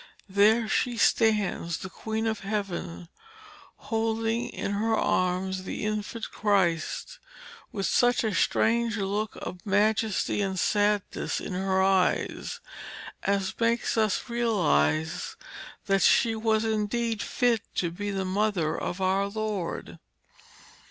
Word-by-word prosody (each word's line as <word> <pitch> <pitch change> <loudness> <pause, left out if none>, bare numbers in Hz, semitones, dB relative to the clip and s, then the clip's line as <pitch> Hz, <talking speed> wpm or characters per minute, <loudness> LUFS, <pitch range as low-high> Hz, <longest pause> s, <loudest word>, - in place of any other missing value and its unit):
There 215 +4 +4
she 240 +2 0
stands, 210 -8 +2
the 190 - -6
Queen 220 +2 -3
of 220 -1 -1
Heaven, 195 -4 -4 0.7
holding 225 -1 -1
in - - -4
her 220 +2 +1
arms 185 -1 0
the 185 - -4
Infant 215 +1 -3
Christ, 195 - 0 0.5
with 195 -2 -2
such 245 0 +3
a 220 -2 0
strange 230 +4 +2
look 205 +1 -2
of 180 0 -7
majesty 210 0 +1
and 190 -1 -1
sadness 205 +1 0
in - - -5
her 190 +1 +1
eyes 190 -1 +1 0.6
as 195 -1 0
makes 230 0 +1
us 215 0 +1
realise 160 - +1 0.5
that 195 0 +2
she 230 - +4
was 220 0 +1
indeed 220 +1 -1
fit 240 -3 +1
to 170 -2 0
be 205 +4 -4
the 195 -1 -2
Mother 190 -4 0
of 185 - -4
our 190 +1 +2
Lord. 210 -4 -4
205 Hz, 120 wpm, -27 LUFS, 190-225 Hz, 0.7 s, There